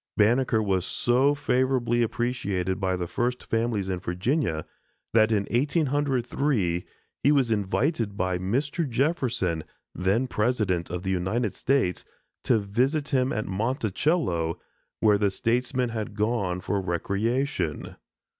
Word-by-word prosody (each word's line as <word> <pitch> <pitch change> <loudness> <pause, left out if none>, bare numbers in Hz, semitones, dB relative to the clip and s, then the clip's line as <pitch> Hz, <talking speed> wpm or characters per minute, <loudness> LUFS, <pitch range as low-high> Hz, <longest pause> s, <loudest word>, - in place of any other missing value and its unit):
Banneker 115 +1 +3
was 95 -3 +1
so 130 +8 +2
favorably 130 -4 +1
appreciated 100 -6 -1
by 95 -2 0
the 90 -1 -2
first 125 +7 -2
families 115 -4 -1
in 95 -2 -2
Virginia, 90 - -1 0.5
that 110 0 +5
in 105 -2 +2
1803 135 - +1 0.4
he 140 - +4
was 135 -5 +3
invited 110 - 0
by 95 -2 0
Mr. 140 - -1
Jefferson, 120 - 0 0.3
then 95 +8 +1
President 105 -7 0
of 90 +1 -4
the 95 - -1
United 95 +4 0
States, 130 -10 0 0.4
to 120 - +4
visit 130 +9 0
him 130 -2 +2
at 110 - -2
Monticello, 105 - 0 0.4
where 105 -2 +4
the 100 -1 +3
statesman 125 +4 0
had 110 -2 -4
gone 105 -5 0
for 100 +1 -1
recreation. 100 - -1
115 Hz, 125 wpm, -26 LUFS, 95-130 Hz, 0.5 s, that